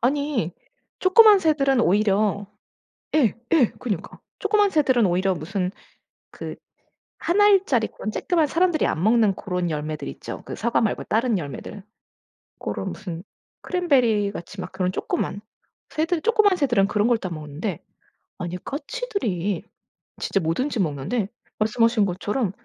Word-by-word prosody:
아니 270 - 0 0.5
쪼끄만 415 +2 +7
새들은 275 -6 +2
오히려 205 0 +2 0.7
예 260 -10 +3 0.2
예. 275 -9 +4
그러니까. 210 -9 -4 0.2
쪼끄만 415 -1 +3
새들은 260 - +3
오히려 185 +1 +2
무슨 180 +3 -3 0.6
그 - - -7 0.7
1 355 +4 +1
알짜리 390 - +4
그런 215 - -5
쬐끄만 320 +8 +1
사람들이 335 +2 +2
안 160 - -1
먹는 220 -1 +4
그런 180 -3 -2
열매들 150 -1 -4
있죠, - - -7
그 - - -5
사과 235 +2 0
말고 220 - 0
다른 230 0 +1
열매들. 175 +5 -6 0.8
고런 190 - -4
무슨 175 -4 -7 0.4
크랜베리같이 225 - 0
막 - - -7
그런 185 -1 0
쪼끄만. 195 +1 -2 0.5
새들 325 +2 0
쪼끄만 425 -1 +3
새들은 240 - +2
그런 210 +1 +1
걸 240 -1 +4
따 185 -4 -5
먹는데 155 +3 -5 0.6
아니 175 0 -4
까치들이 285 - -3 0.6
진짜 - - 0
뭐든지 225 - -1
먹는데 175 - -1 0.3
말씀하신 220 0 +2
것처럼 200 +4 -1
220 Hz, 300 characters per minute, -23 LUFS, 185-295 Hz, 0.8 s, 쪼끄만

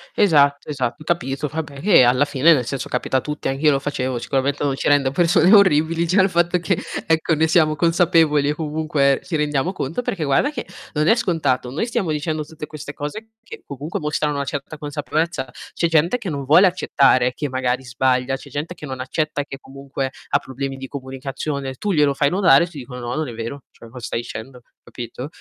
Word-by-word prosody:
esatto, 145 -8 +3
esatto, 130 0 -3
capito, 150 -4 -2
vabbè 145 -3 -6
che 185 -8 +6
alla 125 +3 +4
fine, 145 +3 +4
nel 125 -5 0
senso, 135 +2 -4
capita 125 +1 -1
a - - 0
tutti. 150 -2 -4
Anch'io 140 +3 +2
lo 135 - +1
facevo 130 -3 -2
sicuramente 140 +3 -1
non 140 -2 0
ci - - -2
rende 140 -2 +3
persone 175 +4 +4
orribili 165 -4 +4
già 190 +3 +4
il 190 - +3
fatto 175 +1 +2
che 175 +1 -1 0.2
ecco 160 0 +2
ne 160 +1 +2
siamo 155 -2 +3
consapevoli 165 -3 +3
e 150 - 0
comunque 150 -3 +1
ci 165 - -3
rendiamo 150 +4 0
conto. 160 - -3
Perché 185 -9 -3
guarda 145 - +2
che - - -5 0.3
non 150 +1 +1
è 225 - +6
scontato. 140 -8 0
Noi 155 - -2
stiamo 195 -8 -1
dicendo 155 0 -2
tutte 155 -1 -8
queste 145 -2 -8
cose 215 +10 -7
che 225 - -10
comunque 145 +3 -5
mostrano 150 -1 -1
una 140 0 -2
certa 145 +2 -5
consapevolezza. 150 -2 -3 0.2
C'è 170 - +1
gente 165 +9 +3
che 195 - -6
non 140 -3 -4
vuole 175 +8 +6
accettare 130 -8 +2
che 145 -3 -4
magari 130 0 -1
sbaglia, 130 +1 0
c'è 140 - -13
gente 150 +6 -4
che 150 - -10
non 130 -2 -5
accetta 150 +2 -2
e - - -7
che 135 - -7
comunque 135 0 -5 0.2
ha 140 - +3
problemi 135 +1 -5
di 135 0 -7
comunicazione, 135 +1 -5
tu 205 +10 -3
glielo 150 -4 +3
fai 140 +1 +2
notare, 180 -1 +5
ti 160 - -12
dicono: 125 -1 -8
"No, 120 +1 -4
non 155 -2 -2
è 120 - -7
vero, 115 +5 -6
cioè 115 - -15
co 125 +1 -10
stai 115 0 -3
dicendo," 125 +2 -9 0.2
capito. 120 +2 -7
145 Hz, 210 wpm, -21 LUFS, 135-160 Hz, 0.3 s, che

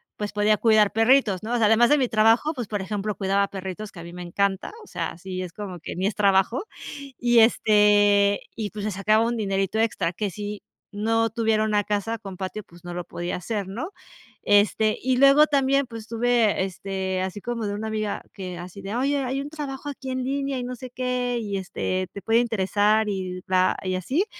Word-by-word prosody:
pues 210 -1 -4
podía 210 +1 +3
cuidar 215 -1 +4
perritos, 225 -4 +3
¿no? 225 +3 -4
O - - +2
sea, 225 - +3
además 225 +3 +5
de 295 - +5
mi 260 -3 +2
trabajo, 225 +7 +3
pues, 245 -7 -5
por 205 -1 -3
ejemplo, 210 +1 -3
cuidaba 200 0 +1
perritos 195 +2 -6
que 175 - -12
a - - -8
mí 170 0 -10
me 180 - -8
encanta, 190 - -1
o - - -16
sea, - - -3
así 185 +1 -6
es 180 -2 -6
como 190 -3 -7
que - - -7
ni 185 - -1
es 205 - +1
trabajo 200 - +2 0.5
y, 240 -1 +4
este, 205 -2 +4
y, 215 -2 -3
pues, 210 -1 -6
se 215 - -1
sacaba 215 +3 +2
un 235 0 -1
dinerito 195 0 -1
extra, 220 -6 0
que 205 +3 -2
si 205 +3 -6 0.3
no 225 +2 +1
tuviera 220 -1 +1
una 210 -1 +1
casa 210 +2 -2
con 195 -4 -9
patio, 190 +3 -5
pues 175 -1 -18
no 175 - -6
lo 175 0 -4
podía 175 +1 -4
hacer, 200 +2 -3
¿no? 240 - -5 0.5
Este, 210 +1 +3
y 260 0 +1
luego 275 +3 +7
también, 275 -1 +2
pues, 225 -3 -9
tuve, 230 -3 +2
este, 190 0 -3
así 190 +2 -4
como 230 -1 -3
de 205 - -2
una 220 +2 -4
amiga 215 -1 -3
que 185 -2 -6
así 180 +3 -9
de: 195 +3 -5
"Oye, 275 +4 +1
hay 265 +2 -2
un 285 - -6
trabajo 290 -2 -6
aquí 270 -2 -7
en 255 0 -2
línea 275 +1 -2
y 250 - -3
no 250 +1 -5
sé 255 +2 -8
qué 250 -1 -1
y 200 -2 -3
este, 185 0 -2
te 200 - -7
puede 225 +4 +3
interesar 215 -1 +2
y 185 -2 -4
bla 185 0 +2
y 185 -1 -1
así". 265 - 0
210 Hz, 215 wpm, -24 LUFS, 195-240 Hz, 0.5 s, luego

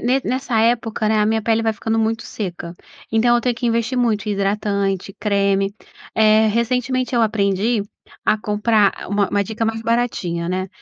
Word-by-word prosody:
ne 255 +3 +1
nessa 255 -3 -1
época, 225 -2 +1
né, 215 0 +2
a 210 - +3
minha 220 +1 +1
pele 225 +1 +1
vai 225 0 +1
ficando 225 +2 -2
muito 225 +1 0
seca. 175 -4 -6 0.4
Então, 240 +2 +3
eu - - +1
tenho 245 0 0
que 240 - -3
investir 230 +2 0
muito 215 -4 0
em - - +1
hidratante, 200 -1 -1
creme. 200 -1 +1 0.4
Eh, 220 0 +5
recentemente 250 +3 0
eu 235 - +3
aprendi 205 +1 +1 0.4
a 215 - +3
comprar 210 0 +2
ah, - - -9
uma 205 0 +1
uma 200 0 +1
dica 225 +2 -3
mais 225 0 -1
baratinha, 210 -8 -1
né? 185 +1 -2
220 Hz, 185 wpm, -20 LUFS, 200-230 Hz, 0.4 s, Eh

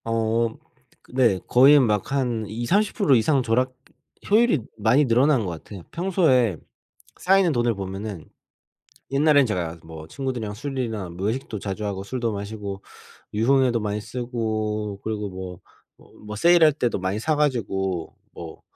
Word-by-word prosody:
어. 115 0 +1 0.5
그 - - -20
네 115 -8 +3
거의 140 +4 +7
막 105 -5 0
한 125 -5 -1
20-30% 145 - +1
이상 135 +4 +3
절약 125 +3 +1 0.6
효율이 220 - +4 0.2
많이 120 +7 +3
늘어난 125 0 +3
것 - - -3
같아요. 90 +4 -9
평소에 160 - +2 0.6
쌓이는 190 -2 +3
돈을 120 -3 +1
보면은 95 -2 -6 0.9
옛날엔 145 -1 +4
제가 85 -6 -3
뭐 80 -1 -10
친구들이랑 125 - -4
술이나 115 -7 -4
뭐 90 +3 -4
외식도 115 -3 -4
자주 100 +2 -4
하고 95 -1 -3
술도 115 +2 -3
마시고 100 -1 -6 0.5
유흥에도 125 +2 +2
많이 105 0 -2
쓰고 110 -3 -3
그리고 105 -2 -3
뭐 90 -2 -8 0.4
뭐 - - -21
-뭐 105 0 -6
세일할 170 +3 +5
때도 125 -7 -1
많이 95 +3 -2
사 155 +6 0
가지고 95 - -1 0.2
뭐 80 -1 -10
115 Hz, 280 characters per minute, -23 LUFS, 100-135 Hz, 0.9 s, 거의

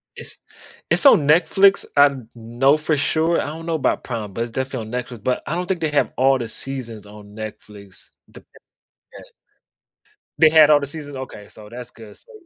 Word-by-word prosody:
It's - - -10 0.5
it's - - +2
on 155 - +6
Netflix, 190 +5 +4
I 145 0 +6
kn 130 -5 -10
know 120 +5 +1
for 155 0 -1
sure, 160 +4 +1
I - - -4
don't 160 +2 -8
know 165 -1 -2
about 155 - -1
Prime, 110 -5 -6
but 115 - -2
it's 120 - -7
definitely 130 -2 -4
on 125 - 0
Netflix, 120 -4 -12
but 125 - -1
I 155 - -3
don't 180 +1 -3
think 185 -3 -2
they 160 - 0
have 145 - +1
all 135 +1 +3
the 120 - -4
seasons 120 -6 -7
on 105 0 -14
Netflix, 105 -2 -11 0.2
the - - -16 0.7
yeah. - - -12 1.2
They 160 - +7
had 155 -1 +6
all 150 -1 +6
the 140 - -5
seasons? 145 -1 -9
Okay, 130 -6 -9
so 105 - -14
that's 125 +1 -9
good, 110 -3 -14
so - - -17
135 Hz, 200 wpm, -20 LUFS, 115-155 Hz, 1.2 s, They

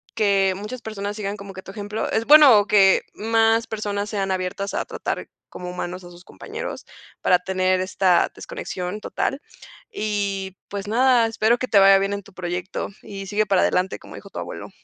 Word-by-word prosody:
que 195 -3 +3
muchas 210 +5 -7
personas, 205 -1 -5
sigan 205 -1 -4
como 200 0 -9
que 190 - -8
tu 195 - -10
ejemplo. 210 +1 -4
Es 225 - 0
bueno 275 -8 +8
que 195 -3 +5
más 225 +1 +2
personas 205 -1 -3
sean 195 -2 -2
abiertas, 185 +2 -3
a - - -1
tratar - - -5 0.2
como 180 0 -8
humanos 180 0 -5
a 175 - -11
sus 175 +1 -15
compañeros, 460 +3 -7 0.4
para 180 - +4
tener 185 0 0
esta 185 -1 +2
desconexión 210 - -5
total, 270 - -2 0.5
y 200 - -2
pues 200 0 -5
nada, 245 +1 +4
espero 225 +1 +2
que 255 - -2
te 205 - +5
vaya 195 0 +7
bien 195 +1 -1
en 200 - -5
tu 200 - -18
proyecto, 180 +1 -4
y 195 -1 -8
sigue 210 +2 +1
para 195 -2 +2
adelante, 185 +1 +1
como - - -13
dijo - - -11
tu - - -8
abuelo. - - -7
200 Hz, 185 wpm, -23 LUFS, 190-220 Hz, 0.5 s, bueno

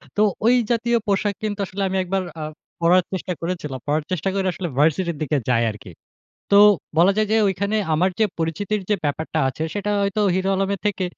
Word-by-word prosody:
তো 210 - +2 0.2
ওই 240 +2 +6 0.2
জাতীয় 235 0 +2
পোশাক 205 +1 +1
কিন্তু 210 -1 -3
আসলে 195 +1 -6
আমি 190 0 -1
একবার 190 +1 -1 0.2
আ - - -3 0.4
পড়ার 175 +2 +4
চেষ্টা 185 0 -3
করেছিলাম। 165 -6 -4
পড়ার 150 +1 +1
চেষ্টা 185 +1 -1
করে 195 -1 0
আসলে 175 +1 -4
ভার্সিটির 165 +2 +2
দিকে 150 0 0
যাই 115 -1 +3
আরকি। 105 -3 -12 0.6
তো 200 - +6 0.4
বলা 180 +4 +6
যায় 215 0 +2
যে, - - +4
ঐখানে 200 +3 -1 0.2
আমার 180 +5 +2
যে 220 - +4
পরিচিতির 185 +6 -1
যে - - +5
ব্যাপারটা 155 +2 -2
আছে, 130 +4 -5
সেটা 205 0 -2
হয়তো 200 +1 0
হিরো 190 +1 0
আলমের 195 0 -1
থেকে, 200 -2 -1
185 Hz, 195 wpm, -22 LUFS, 160-200 Hz, 0.6 s, ওই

